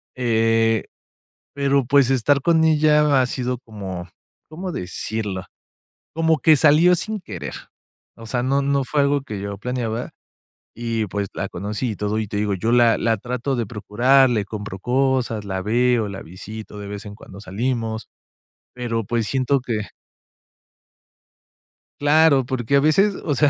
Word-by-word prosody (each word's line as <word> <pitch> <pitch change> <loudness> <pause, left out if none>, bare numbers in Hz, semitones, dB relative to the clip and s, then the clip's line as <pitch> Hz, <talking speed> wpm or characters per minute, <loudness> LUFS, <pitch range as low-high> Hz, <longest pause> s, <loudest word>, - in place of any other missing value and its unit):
eh, 115 -2 +2 0.7
pero, 140 -2 +1
pues, 140 0 +4
estar 135 +2 +2
con 160 +1 +3
ella 150 -3 +4
ha - - +2
sido 125 -1 -2
como, 95 -7 -7 0.4
¿cómo 180 +3 -5
decirlo? 95 +2 -4 0.7
Como 160 0 +2
que 155 +4 +6
salió 160 +5 +5
sin 215 +4 -3
querer. 90 - -7 0.6
O 115 - -11
sea, 120 +1 -1
no 135 +2 +1
no 140 0 +1
fue 145 +2 +1
algo 140 0 +2
que 105 -7 -7
yo 100 0 -5
planeaba 120 0 -3 0.6
y, 115 -1 -2
pues, 100 +1 -3
la 100 - -4
conocí 105 +6 -3
y - - -5
todo, 105 +2 -2
y 110 - -3
te 105 - -4
digo, 105 -1 0
yo 110 +6 -1
la 120 -1 +5
la 115 -1 +1
trato 125 +4 -3
de 120 -2 -1
procurar, 120 +5 +3
le 105 -3 +1
compro 105 -2 -7
cosas, 125 -3 0
la 95 -1 -3
veo, 120 +1 +2
la 100 -1 -7
visito, 105 +5 -9
de 100 - -7
vez 105 +1 -7
en 100 - -8
cuando 100 -2 -13
salimos, 110 +2 -3 0.7
pero 115 -3 -2
pues, 115 0 -1
siento 135 0 +1
que 110 -4 -3 2.2
Claro, 145 -2 +4
porque 130 +1 -1
a - - +6
veces, 190 +7 +3
o 150 - 0
sea, 145 +2 +3
120 Hz, 160 wpm, -22 LUFS, 105-140 Hz, 2.2 s, que